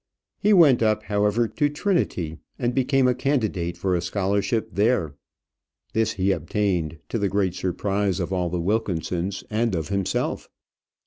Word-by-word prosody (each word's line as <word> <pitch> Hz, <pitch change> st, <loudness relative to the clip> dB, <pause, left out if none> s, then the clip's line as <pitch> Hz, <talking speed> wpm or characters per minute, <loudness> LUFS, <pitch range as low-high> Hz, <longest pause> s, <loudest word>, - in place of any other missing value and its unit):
He 210 Hz, -, +3 dB
went 160 Hz, -, +6 dB
up, 110 Hz, -1 st, +2 dB
however, 105 Hz, +3 st, +1 dB
to 145 Hz, +8 st, 0 dB
Trinity, 145 Hz, -, -1 dB, 0.2 s
and 120 Hz, -2 st, -1 dB
became 135 Hz, 0 st, +2 dB
a 125 Hz, -, +3 dB
candidate 110 Hz, -10 st, -1 dB
for 95 Hz, -1 st, 0 dB
a 85 Hz, -, +1 dB
scholarship 100 Hz, +4 st, 0 dB
there. 100 Hz, -, +1 dB, 0.8 s
This 110 Hz, -1 st, +1 dB
he 95 Hz, 0 st, +1 dB
obtained 85 Hz, -2 st, -1 dB
to 115 Hz, -, -1 dB
the 100 Hz, -1 st, +1 dB
great 95 Hz, -3 st, 0 dB
surprise 95 Hz, +2 st, -1 dB
of 90 Hz, +1 st, -2 dB
all 90 Hz, -2 st, 0 dB
the 90 Hz, +1 st, -2 dB
Wilkinsons 95 Hz, -1 st, -1 dB
and 110 Hz, -1 st, +1 dB
of 80 Hz, -2 st, -3 dB
himself. 100 Hz, -2 st, -1 dB
100 Hz, 150 wpm, -24 LUFS, 90-115 Hz, 0.8 s, went